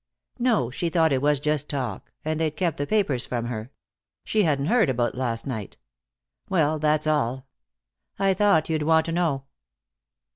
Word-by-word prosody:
"No. 230 Hz, -, +2 dB
She 170 Hz, +6 st, -2 dB
thought 165 Hz, -2 st, +3 dB
it 130 Hz, -, +1 dB
was 145 Hz, -1 st, +2 dB
just 150 Hz, 0 st, -1 dB
talk. 125 Hz, -8 st, -4 dB
And 155 Hz, 0 st, -1 dB
they'd 155 Hz, -2 st, 0 dB
kept 175 Hz, -5 st, 0 dB
the 145 Hz, -, -2 dB
papers 190 Hz, -, +1 dB
from 120 Hz, -2 st, -2 dB
her. 115 Hz, -1 st, -5 dB, 0.5 s
She 215 Hz, -, +1 dB
hadn't 145 Hz, -6 st, +1 dB
heard 220 Hz, -, +3 dB
about 120 Hz, -2 st, 0 dB
last 120 Hz, -3 st, -3 dB
night. 110 Hz, -8 st, -5 dB, 0.7 s
Well, 155 Hz, -5 st, +2 dB
that's 155 Hz, 0 st, +1 dB
all. 130 Hz, -4 st, 0 dB, 0.7 s
I 195 Hz, 0 st, +3 dB
thought 195 Hz, -6 st, +3 dB
you'd 160 Hz, -1 st, -1 dB
want 160 Hz, +1 st, +3 dB
to 165 Hz, -, -3 dB
know." 165 Hz, -6 st, 0 dB
150 Hz, 170 wpm, -25 LUFS, 130-165 Hz, 0.7 s, thought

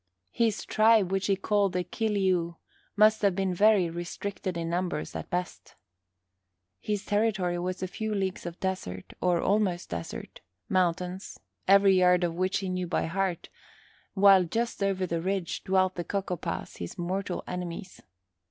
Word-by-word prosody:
His 225 Hz, -3 st, 0 dB
tribe, 215 Hz, -3 st, +4 dB
which 195 Hz, 0 st, 0 dB
he 200 Hz, -, +3 dB
called 200 Hz, 0 st, +1 dB
the 180 Hz, 0 st, 0 dB
Kil 220 Hz, +2 st, -2 dB
ee 190 Hz, -1 st, +3 dB
ou, 170 Hz, -1 st, -1 dB, 0.4 s
must 215 Hz, +1 st, +5 dB
have 200 Hz, -3 st, +3 dB
been 190 Hz, -1 st, 0 dB
very 205 Hz, -1 st, +4 dB
restricted 175 Hz, +2 st, -5 dB
in 165 Hz, 0 st, -3 dB
numbers 175 Hz, -1 st, -2 dB
at -, -, -5 dB
best. 180 Hz, -1 st, -4 dB, 1.0 s
His 210 Hz, -1 st, -3 dB
territory 200 Hz, -5 st, +1 dB
was 185 Hz, +1 st, -3 dB
a -, -, -1 dB
few 220 Hz, +4 st, -4 dB
leagues 190 Hz, -3 st, -2 dB
of 170 Hz, 0 st, -8 dB
desert, 95 Hz, -, -4 dB
or 180 Hz, -1 st, +2 dB
almost 195 Hz, -3 st, +1 dB
desert, 85 Hz, -1 st, -6 dB, 0.3 s
mountains, 180 Hz, +1 st, -1 dB, 0.3 s
every 195 Hz, 0 st, +6 dB
yard 180 Hz, 0 st, +4 dB
of 170 Hz, -1 st, 0 dB
which 185 Hz, +3 st, 0 dB
he 190 Hz, -, -3 dB
knew 185 Hz, -1 st, -2 dB
by 170 Hz, -, 0 dB
heart, 185 Hz, +1 st, -2 dB, 0.7 s
while 195 Hz, -1 st, +7 dB
just 230 Hz, +6 st, -2 dB
over 195 Hz, -1 st, +1 dB
the 170 Hz, -2 st, -2 dB
ridge 190 Hz, -1 st, -2 dB
dwelt 185 Hz, 0 st, +2 dB
the 175 Hz, -, -4 dB
Cocopahs, 190 Hz, -2 st, -4 dB
his 85 Hz, -, -7 dB
mortal 185 Hz, +2 st, -3 dB
enemies. 180 Hz, 0 st, -6 dB
185 Hz, 160 wpm, -28 LUFS, 175-200 Hz, 1.0 s, while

